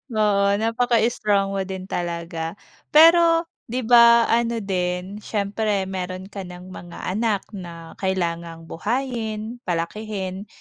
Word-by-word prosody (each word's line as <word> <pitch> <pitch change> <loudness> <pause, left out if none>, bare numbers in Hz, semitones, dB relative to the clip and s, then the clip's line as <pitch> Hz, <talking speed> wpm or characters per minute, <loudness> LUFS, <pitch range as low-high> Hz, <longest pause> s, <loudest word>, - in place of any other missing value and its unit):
Oo, 205 -2 +3
napaka 230 +2 +1
strong 200 -3 +1
mo 195 - 0
din 190 -1 -5
talaga. 170 -1 -4 0.4
Pero, 330 +1 +7 0.2
'di 250 +2 -3
ba 235 0 +7
ano 235 0 +1
din, 185 +1 -2
siyempre 205 -1 -1
meron 185 0 -5
ka 195 -1 -6
ng 180 +1 -10
mga 175 -1 -10
anak 210 0 0
na 170 -4 -9
kailangang 170 -3 -2
buhayin, 230 +1 -3
palakihin 190 +3 -3
200 Hz, 120 wpm, -23 LUFS, 180-230 Hz, 0.4 s, Pero